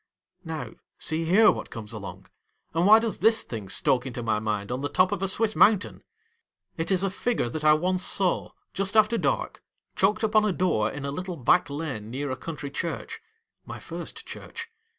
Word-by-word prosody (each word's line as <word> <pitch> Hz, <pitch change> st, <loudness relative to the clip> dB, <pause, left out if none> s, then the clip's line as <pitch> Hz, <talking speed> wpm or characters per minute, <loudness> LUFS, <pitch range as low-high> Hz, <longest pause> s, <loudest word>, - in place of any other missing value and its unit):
Now, 155 Hz, -9 st, -5 dB, 0.3 s
see 160 Hz, +1 st, -2 dB
here 210 Hz, +6 st, +6 dB
what -, -, -6 dB
comes 110 Hz, -2 st, -8 dB
along; -, -, -8 dB, 0.5 s
and 165 Hz, +3 st, +2 dB
why 215 Hz, +1 st, +9 dB
does 225 Hz, -1 st, -2 dB
this 225 Hz, +1 st, +4 dB
thing 105 Hz, -5 st, -7 dB
stalk 125 Hz, +6 st, +1 dB
into 120 Hz, -1 st, -5 dB
my 110 Hz, -2 st, +1 dB
mind 105 Hz, -1 st, -3 dB
on 125 Hz, +2 st, -2 dB
the 145 Hz, -, -2 dB
top 185 Hz, +3 st, +3 dB
of 200 Hz, -2 st, -2 dB
a 195 Hz, -, +1 dB
Swiss 215 Hz, +3 st, +1 dB
mountain! 205 Hz, -2 st, +3 dB, 0.7 s
It 165 Hz, -, -3 dB
is 190 Hz, -1 st, +2 dB
a 195 Hz, -, 0 dB
figure 230 Hz, -, -1 dB
that 155 Hz, +5 st, -5 dB
I 150 Hz, 0 st, +7 dB
once 180 Hz, +3 st, 0 dB
saw, 190 Hz, -3 st, 0 dB, 0.2 s
just 195 Hz, +2 st, -1 dB
after 215 Hz, +2 st, +4 dB
dark, -, -, -1 dB, 0.3 s
chalked 210 Hz, +3 st, +2 dB
upon 215 Hz, 0 st, +4 dB
a 210 Hz, -3 st, +1 dB
door 170 Hz, -13 st, +1 dB
in 140 Hz, -, -6 dB
a 140 Hz, -, -2 dB
little 180 Hz, +3 st, -5 dB
back 135 Hz, +3 st, +3 dB
lane 140 Hz, -8 st, -5 dB
near 135 Hz, +3 st, -3 dB
a -, -, -1 dB
country 145 Hz, 0 st, -6 dB
church 165 Hz, +3 st, -4 dB, 0.2 s
— -, -, -50 dB
my -, -, -6 dB
first -, -, -7 dB
church. 460 Hz, 0 st, -8 dB
165 Hz, 200 wpm, -26 LUFS, 135-205 Hz, 0.7 s, why